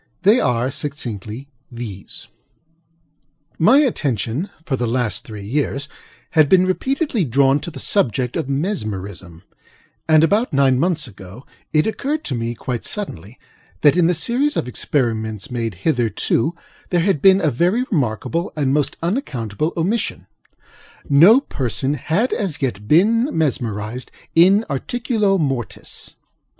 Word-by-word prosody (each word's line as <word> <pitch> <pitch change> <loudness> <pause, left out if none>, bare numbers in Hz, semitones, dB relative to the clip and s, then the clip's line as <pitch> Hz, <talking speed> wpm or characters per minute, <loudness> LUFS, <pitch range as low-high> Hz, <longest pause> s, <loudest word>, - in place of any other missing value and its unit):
They 210 +5 +5
are, 125 - +1
succinctly, 135 -3 -5 0.2
these: 115 -5 -7 1.3
My 220 +12 +6
attention, 145 - -1 0.2
for 135 - 0
the 120 -2 -2
last 120 -1 -1
three 105 -2 -9
years, 140 +4 -1 0.4
had 155 -4 +4
been 185 -1 +5
repeatedly 260 - 0
drawn 135 +1 +3
to 170 - -6
the 165 - -11
subject 125 - 0
of 135 - -2
Mesmerism; 100 - -4 0.6
and, 155 -1 +5
about 205 +3 +2
nine 135 -2 +3
months 165 -1 +1
ago 95 +6 -12 0.3
it 155 0 +3
occurred 285 +7 -2
to - - -3
me, 120 0 -3
quite 120 0 -4
suddenly, 120 - -4 0.4
that 145 0 +5
in 175 -2 +4
the 175 - +2
series 250 - +1
of - - -1
experiments 110 -6 -1
made 115 -5 -3
hitherto, 125 - +1 0.3
there 175 -2 +2
had 175 -5 +1
been 190 +2 +6
a 155 -6 +1
very 180 - +1
remarkable 165 - -1
and 140 -3 0
most 145 -1 0
unaccountable 155 - -2
omission:ŌĆöno 195 - +1
person 130 +1 -1
had 165 - 0
as 180 -8 -2
yet 105 -7 -3
been 225 - +4
mesmerized 120 -6 -2 0.2
in 195 +6 +5
articulo 210 - 0
mortis. 135 - -3
145 Hz, 130 wpm, -20 LUFS, 120-185 Hz, 1.3 s, My